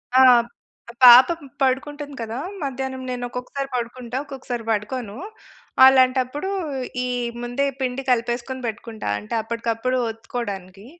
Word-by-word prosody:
ఆ! 260 - +7 0.8
పాపం 255 +7 +9 0.2
పడుకుంటుంది 285 +2 -1
కదా! 225 +2 -4 0.2
మధ్యాహ్నం 265 -1 -4
నేను 245 -1 -4
ఒక్కొక్కసారి 250 +3 -5
పడుకుంటా, 245 0 -4
ఒక్కొక్కసారి 260 -4 -6
పడుకోను. 215 0 -2 0.7
అలాంటప్పుడు 260 +5 +3 0.6
ఈ - - -2 0.4
ముందే 245 +4 -1 0.2
పిండి 255 +1 -2
కలిపేసుకొని 240 +2 -1
పెట్టుకుంటా. 220 - -5
అంటే 105 - -9
అప్పటికప్పుడు 230 +2 -2
ఒత్తుకోవడానికి. 200 -4 -7
250 Hz, 105 wpm, -22 LUFS, 230-265 Hz, 0.8 s, పాపం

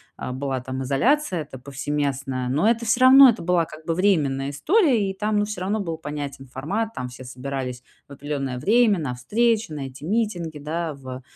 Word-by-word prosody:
а, - - -5
была, 130 0 -3
там, 130 +1 -5
изоляция 185 - +1
эта 135 -3 -9
повсеместная. 140 -1 -3
Но 145 +10 +1
это 235 0 0
всё 230 +3 +1
равно, 265 +1 +9
это 235 -7 +1
была, 175 -1 +2
как 155 +1 -13
бы, 165 - -1
временная 145 -8 +1
история, 255 - +2
и - - -3
там, 210 +2 0
ну, 205 - +1
всё 210 -3 -5
равно 205 +3 -1
был 165 -4 -4
понятен 145 -3 -6
формат, 200 - -3
там 125 0 -4
все 125 +1 -11
собирались 125 -1 -5 0.2
в 140 - -11
определённое 140 -2 -4
время 215 - +4
на 145 -7 -3
встречи, 220 - +1
на 140 -3 -4
эти 135 +3 -11
митинги, 180 -6 -1
да, 155 +2 -3
в 130 -1 -8
150 Hz, 195 wpm, -23 LUFS, 135-210 Hz, 0.2 s, равно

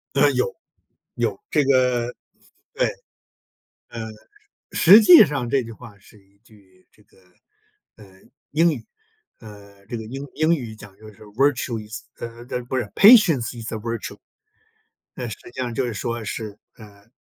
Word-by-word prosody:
呃， - - +5
有， 475 0 -1 0.6
有。 - - -2
这 145 - +2
个 125 -2 +1 0.6
对， - - +1 1.0
呃， 115 -1 -7 0.7
实 200 +6 +7
际 270 - +9
上 140 -5 -3
这 135 +2 +2
句 115 - -9
话 110 -2 -13
是 100 +2 -20
一 100 +1 -31
句 100 -5 -24
这 105 - -26
个， - - -29 0.8
呃， 95 -3 -18 0.3
英 165 +3 +3
语。 125 -7 -7 0.6
呃， 100 -2 -15
这 120 - -5
个 110 - -6
英 135 +5 -7
英 155 +2 +2
语 120 -9 -3
讲 105 -3 -14
就 110 0 -14
是： 100 - -19 0.2
“virtue 130 -4 +1
is”， 110 - -8 0.2
呃， 120 0 -8
呃， 125 - -2
不 130 +2 -4
是 130 - +1
“Patience 195 - +6
is 115 - -6
a 110 - -2
virtue”。 115 +1 -6 1.0
呃， - - -5
实 - - -7 0.2
际 - - -7
上 120 -1 -3
就 130 0 -1
是 120 - -4
说 115 +2 -4
是， 105 -1 -6 0.2
呃， 100 -1 -16
115 Hz, 235 characters per minute, -22 LUFS, 105-135 Hz, 1.0 s, 际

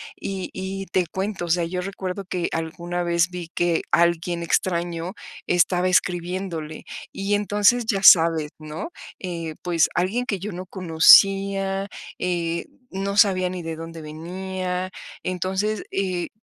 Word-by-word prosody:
Y 190 -1 -5
y 195 +1 -4
te 180 0 +1
cuento, 190 +1 -3
o - - -7
sea, 170 0 +2
yo 180 +2 -3
recuerdo 190 0 -5
que 180 -1 -2
alguna 170 +2 -3
vez 170 +1 +2
vi 180 -2 -7
que 175 -1 +1
alguien 170 0 +2
extraño 170 0 -1 0.3
estaba 180 +1 +3
escribiéndole. 175 -3 -1 0.3
Y 200 +1 -1
entonces, 210 +3 +3
ya 200 -3 0
sabes, 165 -4 +7
¿no? 155 - -6 0.3
Eh, 170 -4 -4
pues, 170 -3 +2
alguien 200 +8 0
que 200 -5 -2
yo 205 +4 -5
no 185 +1 -6
conocía, 195 +2 +5 0.3
eh, 170 -2 -1 0.3
no 195 +1 -3
sabía 185 -3 +4
ni 185 -1 -5
de 165 -1 -5
dónde 165 0 -8
venía. 180 +4 -4 0.3
Entonces, 190 +4 -1
eh, 185 -3 -1
180 Hz, 140 wpm, -23 LUFS, 170-195 Hz, 0.3 s, sabes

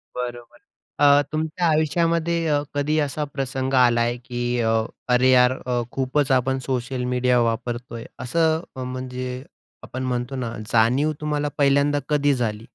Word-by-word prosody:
बरोबर. 120 -1 -6 0.4
अ, 145 0 +6
तुमच्या 160 +3 -1
आयुष्यामध्ये 165 +2 +1
अ, 145 -1 +2
कधी 150 +2 0
असा 145 +1 -1
प्रसंग 135 -1 -3
आलाय 120 -1 +3
की 120 -1 -5 0.2
अ, 110 -1 +1 0.4
"अरे 130 +1 +4
यार 125 0 +5
अ, 125 -1 0
खूपच 135 +1 0
आपण 130 +1 +2
सोशल 125 0 -2
मीडिया 125 0 +2
वापरतोय?" 115 +1 -3
असं 160 +4 +1 0.2
म्हणजे 130 0 -5 0.4
आपण 130 +1 -6
म्हणतो 125 +1 -2
ना 120 -3 -4 0.2
जाणीव 125 +7 +3
तुम्हाला 150 -1 -1
पहिल्यांदा 140 +1 +3
कधी 145 -1 +2
झाली? 110 -2 -3
130 Hz, 135 wpm, -23 LUFS, 125-145 Hz, 0.4 s, अ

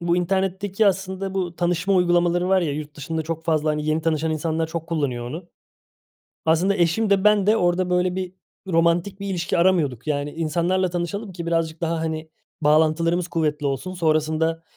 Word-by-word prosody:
bu 170 0 +1
internetteki 195 +3 0
aslında 190 0 -1
bu 175 -3 -2
tanışma 175 +2 +1
uygulamaları 175 0 +2
var 190 -1 +4
ya, 155 -4 -1
yurt 150 0 -6
dışında 160 +3 -3
çok 165 +1 -5
fazla, 155 -2 +1
hani, 150 0 -2
yeni 155 +1 0
tanışan 160 0 0
insanlar 160 +1 -1
çok 165 0 -5
kullanıyor 135 -7 -2
onu. 170 +6 -7 1.0
Aslında 175 +5 +3
eşim 180 +5 +1
de 195 0 +3
ben 210 -2 +4
de 215 +2 +4
orada, 180 -1 +1
böyle, 180 0 +1
bir 185 -1 -4 0.4
romantik 170 +3 +1
bir 200 - -4
ilişki 175 -2 -1
aramıyorduk, 160 -9 +2
yani, 145 -1 -1
insanlarla 170 +3 0
tanışalım 185 +4 -4
ki 170 -1 -6
birazcık 165 -1 -1
daha, 165 -1 -1
hani, 160 0 -4 0.3
bağlantılarımız 160 +3 +2
kuvvetli 150 -3 -1
olsun, 140 +7 -3
sonrasında 160 0 0
170 Hz, 170 wpm, -23 LUFS, 160-185 Hz, 1.0 s, var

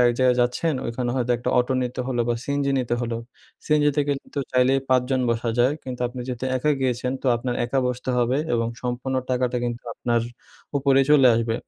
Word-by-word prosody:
আরেক 120 -1 +4
জায়গায় 125 -1 +4
যাচ্ছেন 140 +6 0
ওইখানে 120 +1 -2
হয়তো 125 -1 -1
একটা 120 +1 -2
অটো 125 +2 +1
নিতে 125 0 -3
হলো 125 -2 -1
বা 120 - +2
সিএনজি 140 -1 0
নিতে 120 -2 -1
হল। 120 -1 -3 0.5
সিএনজিতে 150 -1 +2
কিন্তু 140 0 -3
চাইলেই 130 +2 +3
৫ 130 -1 +4
জন 130 - +2
বসা 115 0 -1
যায় 125 +4 +4
কিন্তু 125 -1 -7
আপনি 125 +1 -8
যেহেতু 125 -1 -4
একা 150 +4 +1
গিয়েছেন 125 0 0
তো - - -3
আপনার 120 +1 -3
একা 135 +3 -1
বসতে 125 +1 -2
হবে 120 +2 +2 0.2
এবং 115 0 0
সম্পূর্ণ 125 +1 -3 0.2
টাকাটা 125 -1 0
কিন্তু 120 0 -3
আপনার 120 -1 0 0.6
উপরে 135 -1 +4
চলে 140 -3 +7
আসবে। 115 0 0
125 Hz, 195 wpm, -24 LUFS, 120-135 Hz, 0.6 s, চলে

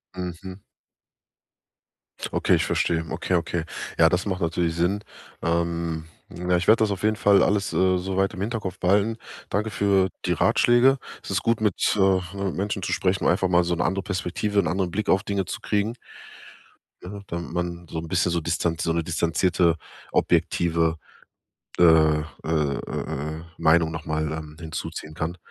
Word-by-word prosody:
Mhm. 90 +1 -6 1.7
Okay, - - +3
ich - - +1
verstehe. 80 -1 0
Okay, 90 +2 -1
okay. 85 0 -1 0.3
Ja, 80 0 +6
das 90 +2 0
macht 95 -2 -2
natürlich 85 0 0
Sinn. 90 +5 0 0.4
Ähm, 85 -1 -1 0.3
ja, 90 0 +1
ich 85 - -3
werde 110 +1 +6
das 105 - +1
auf 100 -1 -4
jeden 110 0 +2
Fall 100 -2 +4
alles, 100 -1 +1
äh, 95 0 +3
soweit 95 +1 -1
im 95 - -6
Hinterkopf 100 -4 -3
behalten. 100 +4 +2 0.3
Danke 105 +3 -1
für 100 -2 +2 0.2
die - - +2
Ratschläge. 125 +3 +4 0.3
Es - - -9
ist 100 0 0
gut, 115 -1 +1
mit, 105 -3 +2 0.2
äh, 95 -1 +1
Menschen 100 +1 -3
zu - - -3
sprechen, 95 0 0
um - - +5
einfach 95 +1 +1
mal 90 0 +4
so 85 0 0
'ne 85 - 0
andere 95 0 -1
Perspektive, 100 +2 -2
'nen 90 - +2
anderen 90 +1 -1
Blick 105 +3 -2
auf 95 +1 +3
Dinge 100 -3 -1
zu - - -5
kriegen. 105 +2 0 1.1
Ja, 100 +3 -7
damit 85 0 -5
man 85 -1 -4
so 80 - -4
'n 80 - -7
bisschen 90 0 +1
so 85 - 0
Distanz 85 0 -1
so 85 - 0
'ne 85 - 0
distanzierte, 85 +1 +1 0.4
objektive 85 -1 +1 0.8
äh 90 - +4
äh 80 -2 +5 0.2
äh 75 -3 0
äh 75 +3 -4
äh, 80 - -10 0.2
Meinung 80 0 +4
nochmal, 80 -1 -2
ähm, 80 -1 -7
hinzuziehen 80 -1 -6
kann. 80 +3 -4
90 Hz, 170 wpm, -24 LUFS, 85-100 Hz, 1.7 s, Ja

